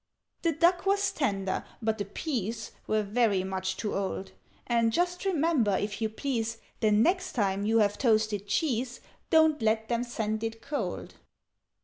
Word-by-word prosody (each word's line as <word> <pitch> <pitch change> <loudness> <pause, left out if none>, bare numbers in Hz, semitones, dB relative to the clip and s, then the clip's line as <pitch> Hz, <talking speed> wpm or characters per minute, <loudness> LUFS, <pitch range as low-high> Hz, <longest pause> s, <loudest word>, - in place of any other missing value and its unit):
"The 335 -2 +2
duck 350 +5 +3
was 400 0 +2
tender, 195 - -1 0.2
but 220 -1 -1
the 205 - -1
peas 225 - -3 0.2
Were 215 0 +2
very 205 -2 +2
much 190 0 -3
too 210 - -2
old: 195 0 -3 0.3
And 230 -1 +2
just 355 - 0
remember, 310 - +2
if 205 +1 -3
you 220 - +1
please, 230 -1 -2 0.2
The 215 - +3
next 345 - +2
time 200 -2 0
you 225 +1 +3
have 205 -2 +2
toasted 215 -4 +2
cheese, 245 0 0 0.3
Don't 315 -4 +4
let 220 0 +1
them 235 0 +1
send 220 -2 -2
it 225 0 -3
cold. 290 - -4
225 Hz, 155 wpm, -29 LUFS, 210-285 Hz, 0.3 s, Don't